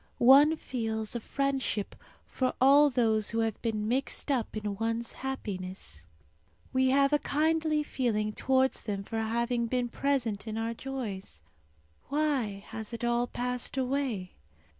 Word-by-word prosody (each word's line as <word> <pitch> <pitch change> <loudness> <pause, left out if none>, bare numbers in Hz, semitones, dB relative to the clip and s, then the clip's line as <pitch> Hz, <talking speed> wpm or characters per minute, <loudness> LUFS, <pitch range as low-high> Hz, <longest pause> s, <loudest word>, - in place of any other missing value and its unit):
One 280 +6 +7
feels 225 -6 -3
a - - 0
friendship 270 -4 -1 0.3
for 255 -1 -1
all 285 +3 +7
those 220 -5 +2
who 230 0 +1
have 225 -2 -2
been 215 -2 -1
mixed 270 +4 -1
up 240 -5 -1
in 205 -2 -3
one's 230 +1 -1
happiness. 185 - -6 0.7
We 260 0 +3
have 275 +2 +3
a 295 - +4
kindly 310 +1 +1
feeling 215 -7 -1
towards 265 +3 +1
them 200 -2 -3
for 225 +3 -4
having 235 +2 0
been 245 0 -1
present 235 -7 -1
in 220 0 -3
our 225 +1 -1
joys. 220 - -6 0.7
Why 265 -9 0
has 220 +1 -6
it 230 - -5
all 240 0 +1
passed 250 +1 -3
away? 255 -8 -1
240 Hz, 140 wpm, -29 LUFS, 220-270 Hz, 0.7 s, One